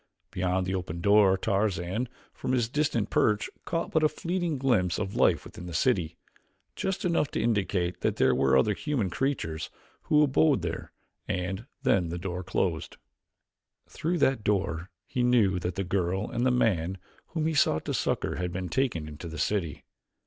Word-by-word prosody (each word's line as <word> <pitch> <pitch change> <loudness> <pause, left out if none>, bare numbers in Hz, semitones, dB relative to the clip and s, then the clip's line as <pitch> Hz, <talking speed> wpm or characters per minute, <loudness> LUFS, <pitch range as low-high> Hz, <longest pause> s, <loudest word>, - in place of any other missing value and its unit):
Beyond 90 0 0
the 95 - -2
open 90 -3 -3
door 100 0 +5
Tarzan, 100 +3 -1 0.2
from 130 - -3
his 120 -3 +2
distant 120 -5 0
perch, 105 0 +2
caught 165 0 -2
but 160 - +3
a 155 - +4
fleeting 175 -1 -2
glimpse 110 -10 +2
of 100 -2 -3
life - - +3
within 90 - -9
the 85 - -6
city, 90 -6 +1 0.6
just 190 -1 -2
enough 170 -5 +2
to - - -3
indicate 100 -5 0
that - - +1
there - - +3
were 65 0 +3
other 105 +11 +3
human 120 - -1
creatures 80 - -2 0.4
who 150 0 +5
abode 145 0 +3
there, - - -4 0.4
and 95 +4 -3 0.2
then 90 -4 +2
the 85 - -3
door 90 0 -4
closed. 85 -2 -2 0.9
Through 170 +3 -2
that 135 -7 +2
door 95 -4 0 0.2
he 125 - -2
knew 115 -7 +3
that 90 +2 -3
the 95 - -1
girl 95 +2 -1
and 120 +2 +1
the - - +4
man 95 -8 +1 0.4
whom 155 - +1
he 160 - +1
sought 80 - +2
to - - -2
succor - - -1
had 90 0 -2
been 90 0 -4
taken 85 - 0
into 75 +3 -8
the 80 0 -7
city. 80 -4 -1
95 Hz, 175 wpm, -28 LUFS, 90-130 Hz, 0.9 s, door